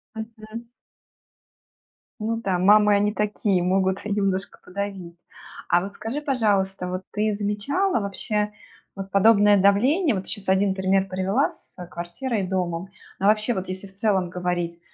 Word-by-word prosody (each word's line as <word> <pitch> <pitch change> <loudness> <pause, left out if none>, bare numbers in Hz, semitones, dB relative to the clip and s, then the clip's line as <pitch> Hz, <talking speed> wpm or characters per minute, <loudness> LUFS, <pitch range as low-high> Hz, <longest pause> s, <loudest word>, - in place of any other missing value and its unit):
Мгм. 220 +1 -8 1.6
Ну 225 +1 0
да. 195 -5 -1
Мамы, 210 +2 +6
они 205 +1 +2
такие, 205 -3 0
могут 190 +1 +1
и 210 - -3
немножко 195 -1 -1
подавить. 190 -3 -5 0.5
А 175 - +4
вот 200 +2 -6
скажи, 225 +9 -4
пожалуйста, 205 - 0
вот 185 +1 -3
ты 210 0 0
замечала 210 - 0
вообще 210 +1 -2 0.4
вот 195 -1 -6
подобное 205 0 +5
давление, 255 - +3
вот 190 -2 -3
ты - - -5
щас 205 -3 -4
1 190 0 +2
пример 190 0 +1
привела 190 +8 +1
с, - - -12
э, 180 - -7
квартирой 180 +8 -3
и - - -3
домом. 180 -1 -2 0.3
А 195 - -1
вообще 215 +3 +3
вот 190 0 -4
если 190 +2 -5
в 195 - -17
целом 195 -3 +1
говорить, 175 -1 -3
200 Hz, 155 wpm, -24 LUFS, 190-215 Hz, 1.6 s, Мамы